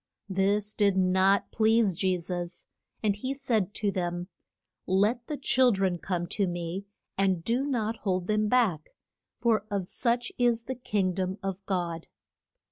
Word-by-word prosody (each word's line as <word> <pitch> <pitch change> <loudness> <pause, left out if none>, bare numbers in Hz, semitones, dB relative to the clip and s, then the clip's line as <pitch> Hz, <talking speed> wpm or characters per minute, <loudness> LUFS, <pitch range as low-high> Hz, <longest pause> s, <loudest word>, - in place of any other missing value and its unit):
This 200 +2 +1
did 200 -3 +2
not 190 +1 +3
please 220 -2 +3
Je 185 +1 +1
sus, 175 0 -5 0.4
and 205 -2 +2
he 260 +6 -3
said 220 -7 0
to 205 -2 0
them, 175 -1 -3 0.6
Let 210 +6 +2
the 300 - -3
chil 260 -2 +4
dren 190 -4 0
come 175 -2 -2
to 200 -3 0
me, 175 +3 -4 0.3
and 190 -4 +2
do 240 +6 +1
not 230 -4 -1
hold 185 -4 -1
them 215 +1 +1
back, 210 -10 +2 0.5
for 225 -4 +2
of 200 -3 -1
such 240 +5 0
is 240 -2 +2
the 260 - -4
king 205 -7 -1
dom 185 +1 -2
of 195 0 -4
God. 170 -4 -2
195 Hz, 155 wpm, -28 LUFS, 185-225 Hz, 0.6 s, chil